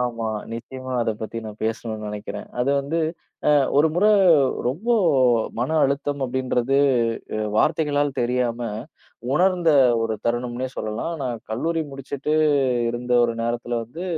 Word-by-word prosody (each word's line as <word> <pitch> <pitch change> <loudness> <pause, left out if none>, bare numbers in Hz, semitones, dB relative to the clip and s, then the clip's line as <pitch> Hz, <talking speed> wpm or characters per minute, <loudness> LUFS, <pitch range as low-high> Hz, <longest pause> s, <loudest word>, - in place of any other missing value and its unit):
ஆமா. 115 -2 -2 0.3
நிச்சயமா, 130 +2 -7
அத 115 - 0
பத்தி 115 +1 -5
நான் 105 0 -9
பேசணும்னு 110 -1 -3
நெனைக்கிறேன் 105 0 -6
அது 130 +3 +1
வந்து, 155 +4 -2 0.5
ஆ, - - +6 0.3
1 160 - +5
முறை 210 +4 +4 0.6
ரொம்ப 190 - -3 0.7
மன 125 - -1
அழுத்தம் 140 +1 -1
அப்டின்றது 130 +1 0 0.8
வார்த்தைகளால் 145 -3 +1
தெரியாம 120 -1 0 0.7
உணர்ந்த 180 +1 +3 0.3
ஒரு 110 -1 -1
தருணம்னே 120 +1 -1
சொல்லலாம். 110 +10 -3
நான் 125 -3 -3
கல்லூரி 160 +9 -1
முடிச்சுட்டு 140 +2 -4 0.6
இருந்த 120 +1 -4
ஒரு 115 -1 +1
நேரத்துல 120 +1 -2
வந்து 155 +10 -8
125 Hz, 125 wpm, -23 LUFS, 115-145 Hz, 0.8 s, ஆ